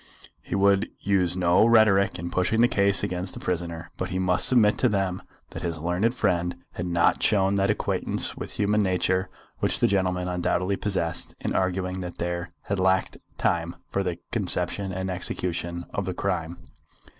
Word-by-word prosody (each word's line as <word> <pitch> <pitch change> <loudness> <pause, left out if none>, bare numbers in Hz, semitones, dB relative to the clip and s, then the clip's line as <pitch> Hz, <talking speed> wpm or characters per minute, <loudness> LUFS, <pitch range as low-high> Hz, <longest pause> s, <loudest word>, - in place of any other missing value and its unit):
He - - -5
would 100 +1 +3
use 95 -3 +1
no 90 +1 +4
rhetoric 110 -4 +4
in 85 +1 -5
pushing 95 +6 +1
the 120 - +6
case 100 -3 +3
against 90 +1 -3
the - - -7
prisoner; 85 -2 -4
but 95 - -2
he 90 - -3
must 90 -1 +4
submit 110 -5 +5
to 125 - +3
them 95 -3 -1 0.3
that - - -7
his 85 -2 -3
learned 90 +9 0
friend 90 -5 0 0.2
had 90 - -5
not 85 -1 +2
shown 100 -2 +2
that 100 -1 +1
acquaintance - - 0
with - - -7
human 105 +1 +1
nature 95 0 0 0.3
which - - 0
the - - +3
gentleman 90 -2 0
undoubtedly 90 +2 0
possessed 95 -5 -2
in - - -3
arguing 95 0 -1
that 90 -1 -6
there 85 0 -3
had 100 -1 -2
lacked 95 0 +1 0.2
time 85 0 0 0.2
for 100 - 0
the 90 -3 -2
conception 95 -2 -2
and 95 +1 -3
execution 85 -1 -3
of 100 - -2
the 95 -1 -4
crime. 85 -3 -2
95 Hz, 175 wpm, -25 LUFS, 90-100 Hz, 0.3 s, the